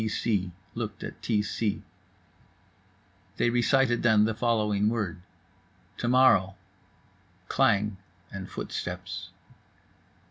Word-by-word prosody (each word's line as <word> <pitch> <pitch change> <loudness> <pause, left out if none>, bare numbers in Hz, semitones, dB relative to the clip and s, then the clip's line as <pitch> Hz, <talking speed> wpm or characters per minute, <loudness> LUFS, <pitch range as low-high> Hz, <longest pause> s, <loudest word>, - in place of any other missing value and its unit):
T 110 - -1
c 100 -4 -1 0.2
looked 110 -3 -5
at - - -8
T 105 -3 +1
c. 105 0 -2 1.5
They 120 - +2
recited 120 0 +2
then 110 -3 +5
the 110 - 0
following 105 -3 +1
word: 105 -7 -3 0.8
"To 120 - -2
morrow." 120 -7 +4 0.9
Klang 100 0 +2 0.3
and 95 -2 -7
footsteps. - - -5
110 Hz, 100 wpm, -28 LUFS, 100-120 Hz, 1.5 s, then